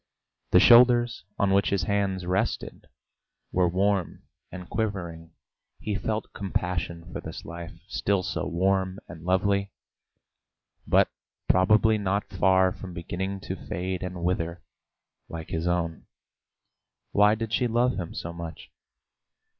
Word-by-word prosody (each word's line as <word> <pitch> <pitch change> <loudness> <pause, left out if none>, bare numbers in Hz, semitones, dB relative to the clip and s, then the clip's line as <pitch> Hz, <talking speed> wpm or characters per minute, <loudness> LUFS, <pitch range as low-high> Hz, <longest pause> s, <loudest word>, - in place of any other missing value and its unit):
The - - +6
shoulders 120 0 +6
on 100 -1 +2
which 100 +1 +3
his 100 -3 0
hands 95 -1 0
rested 90 +2 -2 0.6
were 90 -1 +3
warm 95 -1 0 0.3
and 90 -1 -8
quivering. 85 -7 -4 0.5
He 105 - -3
felt 110 +1 -3
compassion 90 -3 -3
for - - -4
this - - -8
life, 85 +1 -7
still 100 -2 0
so - - -2
warm 95 +1 +1
and 80 -1 -10
lovely, 100 +2 +1 1.2
but - - +4 0.4
probably 110 +4 +4
already 105 - -5
not 100 +1 0
far 95 0 +3
from 90 -1 -9
beginning 95 +3 -4
to 95 - -4
fade 95 -2 -3
and 90 -2 -5
wither 85 -1 -1 0.7
like 80 -1 -7
his 80 +2 -2
own. 85 -2 -1 1.0
Why 105 +1 +5
did 115 0 -4
she 125 +1 +2
love 120 +2 +1
him 85 -2 -6
so 85 - -5
much? 85 -2 -8
95 Hz, 130 wpm, -27 LUFS, 85-100 Hz, 1.2 s, The